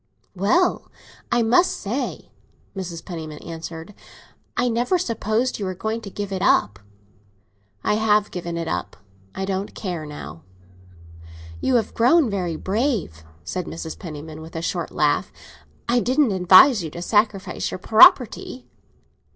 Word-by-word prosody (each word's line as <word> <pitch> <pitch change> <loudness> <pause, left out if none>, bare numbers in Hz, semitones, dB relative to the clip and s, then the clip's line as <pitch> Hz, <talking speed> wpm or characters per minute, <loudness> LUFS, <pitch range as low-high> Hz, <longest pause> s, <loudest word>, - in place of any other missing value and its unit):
"Well, 215 - +1 0.4
I 240 -1 +3
must 255 +11 +3
say," 235 +7 -4 0.4
Mrs. 175 -3 -6
Penniman 160 -4 -7
answered, 165 +2 -8 0.6
"I 245 - +2
never 245 +9 +1
supposed 230 - -1
you 200 - -3
were 185 0 -3
going 220 +4 -3
to 205 - -8
give 205 0 -5
it 190 -1 -3
up." 100 - +2 1.0
"I 210 - +1
have 210 -1 +2
given 170 -1 -5
it 165 -1 -3
up. - - -4 0.4
I 190 - -3
don't 195 +1 -3
care 175 -6 -5
now." 80 - -9 1.2
"You 260 - +1
have 225 -3 0
grown 255 +2 +4
very 180 -4 -2
brave," 195 - -2 0.2
said 180 - -4
Mrs. 160 0 -7
Penniman, 155 -2 -8
with 160 +1 -12
a 165 - -3
short - - -2
laugh. - - +1 0.6
"I 245 +1 +3
didn't 255 +1 +2
advise 190 +5 +6
you 160 - -4
to 170 - -8
sacrifice 210 -1 0
your - - -5
property." 250 - +4
195 Hz, 145 wpm, -22 LUFS, 170-230 Hz, 1.2 s, advise